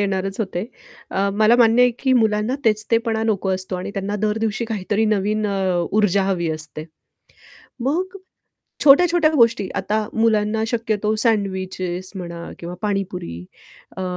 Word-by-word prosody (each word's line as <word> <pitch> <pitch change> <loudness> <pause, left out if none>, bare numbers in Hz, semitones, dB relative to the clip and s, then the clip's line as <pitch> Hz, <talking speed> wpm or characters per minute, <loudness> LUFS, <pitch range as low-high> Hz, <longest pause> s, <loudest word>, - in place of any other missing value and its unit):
येणारच 195 0 -1
होते. 190 -2 -2 0.5
अ, 195 +1 0
मला 215 +3 +4
मान्य 235 0 +5
आहे, 250 - +5
की 265 - +1
मुलांना 220 0 +2
तेच 215 -1 +2
ते 230 - +5
पणा 220 -1 0
नको 205 -3 0
असतो 185 0 -4
आणि 180 - -5
त्यांना 200 +1 -2
दर 210 +1 -1
दिवशी 220 +1 -1
काहीतरी 210 -1 -1
नवीन 215 0 0
अ, 200 -1 -1 0.3
ऊर्जा 200 -2 +3
हवी 180 -4 0
असते. 155 0 -6 1.0
मग 360 +10 -1 0.7
छोट्या-छोट्या 325 +3 +6
गोष्टी, 230 -8 +3
आता 210 +2 -1
मुलांना 220 -1 +1
शक्यतो 220 -2 -1
सँडविचेस 190 -4 -1
म्हणा 170 -2 -7
किंवा 175 +1 -6
पाणीपुरी, 185 - -3 0.5
अ, - - -3
210 Hz, 145 wpm, -21 LUFS, 190-225 Hz, 1.0 s, छोट्या-छोट्या